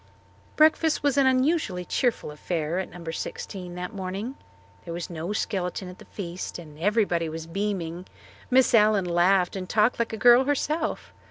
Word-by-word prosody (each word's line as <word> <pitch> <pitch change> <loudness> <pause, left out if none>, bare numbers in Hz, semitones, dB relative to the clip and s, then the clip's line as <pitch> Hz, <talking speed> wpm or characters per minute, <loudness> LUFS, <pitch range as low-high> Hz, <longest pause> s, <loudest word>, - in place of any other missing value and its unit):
Breakfast 315 0 +3
was 285 -2 +2
an 275 -2 +4
unusually 255 - +1
cheerful 245 - 0
affair 160 +2 -2
at 190 - -4
No. 170 -2 -7
16 180 +2 -6
that 180 +4 -5
morning. 195 +5 -4 0.5
There 170 - -6
was 175 +1 -5
no 170 +3 -4
skeleton 190 -3 -2
at 180 - -12
the - - -13
feast 180 -2 -6
and 155 -3 -12
everybody 180 -4 +1
was 160 0 -6
beaming. 180 -1 -3 0.4
Miss 260 0 +4
Allen 210 -3 +5
laughed 180 +2 +2
and 185 -1 -5
talked 215 +3 +2
like 235 - 0
a 220 - -4
girl 245 +2 +6
herself. 300 +3 -1
190 Hz, 165 wpm, -26 LUFS, 175-235 Hz, 0.5 s, girl